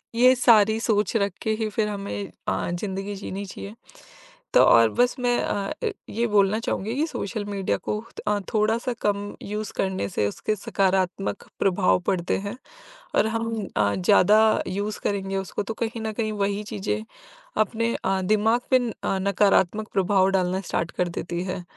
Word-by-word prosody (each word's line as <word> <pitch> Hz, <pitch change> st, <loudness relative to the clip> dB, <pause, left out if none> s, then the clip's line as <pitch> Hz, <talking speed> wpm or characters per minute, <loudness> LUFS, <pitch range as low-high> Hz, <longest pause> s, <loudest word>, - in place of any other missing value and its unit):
ये 250 Hz, +2 st, +6 dB
सारी 220 Hz, -3 st, +5 dB
सोच 210 Hz, -2 st, +1 dB
रख 200 Hz, -3 st, 0 dB
के 220 Hz, -, 0 dB
ही 220 Hz, -, +1 dB
फिर 210 Hz, 0 st, 0 dB
हमें 200 Hz, -1 st, -5 dB, 0.2 s
अ, -, -, -1 dB
ज़िंदगी 195 Hz, +2 st, -4 dB
जीनी 195 Hz, 0 st, -5 dB
चाहिए। 200 Hz, +2 st, -8 dB, 0.8 s
तो -, -, +7 dB
और 115 Hz, -1 st, +6 dB
बस 245 Hz, -, +2 dB
मैं 245 Hz, -1 st, +2 dB
अ, 195 Hz, -1 st, -2 dB, 0.4 s
ये 235 Hz, +2 st, 0 dB
बोलना 205 Hz, 0 st, +3 dB
चाहूँगी 225 Hz, 0 st, -2 dB
कि 295 Hz, +3 st, +1 dB
सोशल 215 Hz, -7 st, -4 dB
मीडिया 200 Hz, -2 st, -1 dB
को 210 Hz, -, 0 dB, 0.3 s
अ, 210 Hz, 0 st, +2 dB
थोड़ा-सा 225 Hz, +3 st, +1 dB
कम 205 Hz, 0 st, -1 dB
यूज़ 210 Hz, +1 st, -4 dB
करने 190 Hz, -, -1 dB
से 105 Hz, -, 0 dB
उसके 215 Hz, -, -2 dB
सकारात्मक 190 Hz, -1 st, 0 dB, 0.2 s
प्रभाव 190 Hz, -1 st, +3 dB
पड़ते 180 Hz, -2 st, +1 dB
हैं 215 Hz, +5 st, -5 dB, 0.6 s
और -, -, +4 dB
हम 225 Hz, -2 st, -2 dB
अ, 100 Hz, -1 st, +3 dB
ज़्यादा 185 Hz, -, +5 dB, 0.3 s
यूज़ 205 Hz, +3 st, -3 dB
करेंगे 195 Hz, -1 st, -1 dB
उसको 195 Hz, +2 st, -3 dB
तो 225 Hz, -, -4 dB
कहीं 230 Hz, 0 st, -4 dB
न 220 Hz, -, -2 dB
कहीं 215 Hz, 0 st, -2 dB
वही 200 Hz, +1 st, -1 dB
चीज़ें 210 Hz, +1 st, -2 dB, 0.6 s
अपने 230 Hz, +2 st, 0 dB
अ, 190 Hz, 0 st, +1 dB
दिमाग 215 Hz, +5 st, +2 dB
में 250 Hz, -2 st, +4 dB
अ, 195 Hz, -, 0 dB
नकारात्मक 200 Hz, +1 st, +2 dB
प्रभाव 195 Hz, 0 st, +3 dB
डालना 185 Hz, +1 st, 0 dB
स्टार्ट 170 Hz, -2 st, -2 dB
कर 180 Hz, -, -1 dB
देती 175 Hz, 0 st, -3 dB
है। 185 Hz, -1 st, -4 dB
205 Hz, 165 wpm, -25 LUFS, 190-220 Hz, 0.8 s, तो